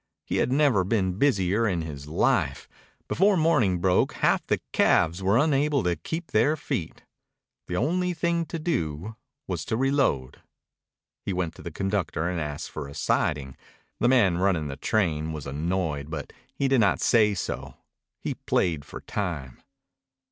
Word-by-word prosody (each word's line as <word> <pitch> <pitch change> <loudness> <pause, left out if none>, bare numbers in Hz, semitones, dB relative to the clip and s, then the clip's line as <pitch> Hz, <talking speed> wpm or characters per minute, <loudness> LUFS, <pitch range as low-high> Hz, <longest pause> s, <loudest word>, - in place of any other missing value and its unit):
He - - -1
had - - +1
never 135 -8 +3
been 95 -2 0
busier 105 -5 +2
in 90 -5 -1
his 70 -3 -7
life. 80 - +1 0.4
Before 195 +1 +3
morning 140 - +3
broke 90 +1 +2
half - - +2
the - - +1
calves 85 +4 +3
were 100 +4 +3
unable 145 -1 +2
to 90 -1 +1
keep 160 - -6
their 145 +9 +3
feet. 85 - -4 0.6
The 90 - -3
only 180 - 0
thing 170 0 0
to 165 - -4
do 100 - -2 0.3
was - - -3
to 110 - -1
reload. 135 - 0 0.8
He 100 - -2
went 90 -3 -2
to - - -13
the - - -6
conductor 95 -2 -1
and 90 -2 -2
asked 75 -1 -5
for 75 -3 -5
a 70 - -11
siding. 65 -3 0 0.4
The 120 - +3
man 100 -9 +4
running 90 -6 +1
the 70 - -5
train 80 -2 0
was 75 -3 -6
annoyed, 75 0 -2
but 80 -2 -6 0.2
he 140 - +1
did 135 -1 +3
not 105 - +3
say 105 -3 +4
so. - - -4 0.4
He - - -3
played 80 -5 0
for - - -9
time. 80 -11 -4
95 Hz, 160 wpm, -26 LUFS, 80-135 Hz, 0.8 s, man